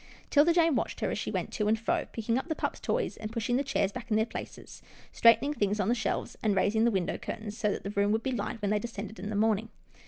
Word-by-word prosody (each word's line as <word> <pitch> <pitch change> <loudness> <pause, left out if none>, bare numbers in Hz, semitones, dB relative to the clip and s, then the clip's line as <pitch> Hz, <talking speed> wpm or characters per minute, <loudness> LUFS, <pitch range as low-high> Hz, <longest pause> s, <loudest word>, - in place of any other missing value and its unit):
'Tilda 300 +3 +6
Jane 330 -2 +4
watched - - -2
her - - 0
as - - -2
she - - -3
went - - -3
to 210 - 0
and 220 +1 +3
fro, 225 - -1
picking 230 0 -1
up 265 - -7
the 315 - -1
pup's - - -3
toys, - - -1
and 215 0 -6
pushing 235 +1 -1
the 270 - +2
chairs 205 -7 0
back 245 +2 -8
in 215 - +3
their 220 - +3
places, - - -8 0.3
straightening 235 +5 +5
things 205 -5 0
on 195 +1 +1
the - - +4
shelves, 220 -5 -2
and 210 -3 +2
raising 220 +4 +3
the - - +5
window 190 -4 -1
curtains, 215 -1 -6
so 215 -3 0
that - - -4
the 200 - -4
room 200 0 +2
would 220 +1 +1
be 265 - -1
light 225 -1 -3
when 200 - +1
they 210 - +2
descended 215 -1 -6
in 205 - -5
the 215 - -3
morning. 220 +1 +1
220 Hz, 275 wpm, -29 LUFS, 205-235 Hz, 0.3 s, Tilda